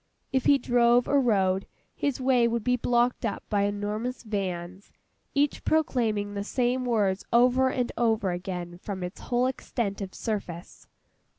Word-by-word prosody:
If 265 -1 +1
he 285 - +6
drove 240 -1 +3
or 280 -1 +3
rode, 195 -6 +1 0.3
his 285 -2 -2
way 255 -2 +3
would 235 -1 -1
be 250 +1 +2
blocked 245 0 +1
up 225 - -2
by 200 -2 +2
enormous 210 +5 -3
vans, 190 -3 -4 0.4
each 285 0 +1
proclaiming 225 -10 0
the 200 0 -3
same 250 +3 0
words 205 -5 +1
over 250 +2 +4
and 250 -1 -1
over 220 -5 +2
again 175 -1 -5
from 190 -1 -5
its 180 +3 -7
whole 245 0 0
extent 235 -5 -3
of 190 -1 -6
surface. 190 -6 -5
225 Hz, 155 wpm, -27 LUFS, 195-250 Hz, 0.4 s, he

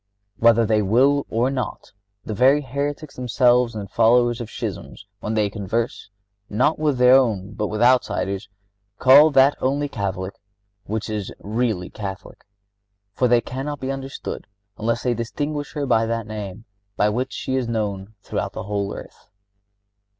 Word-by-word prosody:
Whether 115 0 +5
they 110 0 +2
will 130 +8 +3
it - - -6
or 120 +4 +1
not 130 -2 -4 0.3
the 110 - -4
very 135 +7 +4
heretics 140 +3 -4
themselves 125 -1 +2
and 100 -2 -5
followers 120 +3 +3
of 115 - -6
schism, - - -6 0.2
when 110 - -3
they 105 -1 +2
converse, 105 +3 -3 0.4
not 125 +10 +1
with 150 -4 +1
their 125 0 +6
own 110 -7 +2
but 105 0 -2
with 110 +3 -1
outsiders, 105 -5 +1 0.5
call 140 +6 +7
that 135 0 +5
only 140 +3 0
Catholic 95 -6 -4 0.5
which 110 +1 -3
is 105 -3 -4
really 110 -4 -2
Catholic. 100 -1 -7 0.7
For 125 - +2
they 120 0 +4
cannot 135 +4 -5
be 130 +1 -3
understood 135 0 -6 0.3
unless 115 +2 -1
they 125 - +1
distinguish 145 +6 -4
her 145 -2 -2
by 115 -3 +2
that 115 -1 -2
name, 105 0 -7 0.3
by 105 - +3
which 125 +5 -2
she 130 - -3
is 130 -2 -1
known 105 -2 -3
throughout - - -3
the - - -5
whole 100 0 -3
earth." - - -12
115 Hz, 155 wpm, -22 LUFS, 105-130 Hz, 0.7 s, call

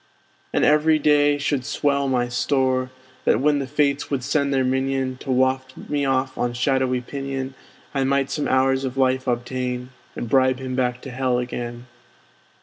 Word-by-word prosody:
And - - +2
every 150 +1 +4
day 145 -1 +3
should 145 -2 -1
swell 140 +1 0
my 125 -2 +1
store; 130 0 +1 0.4
That - - +3
when 145 +2 +2
the 135 - -3
fates 145 0 0
would 135 -3 -1
send 140 +1 +1
their 135 -1 +2
minion, 130 0 0
To 135 - -10
waft 130 0 +1
me 145 -1 -2
off 130 0 0
on 120 0 0
shadowy 130 +1 +1
pinion, 135 0 -5 0.4
I 135 -2 +1
might 135 0 +1
some 150 - -1
hours 130 0 +2
of 130 0 -4
life 130 0 +1
obtain, 125 +1 -2 0.2
And 120 - -4
bribe 130 +1 +3
him 130 -1 -5
back 125 -1 -1
to 135 - -7
hell 125 0 0
again. 120 -1 -4
130 Hz, 170 wpm, -23 LUFS, 130-140 Hz, 0.4 s, every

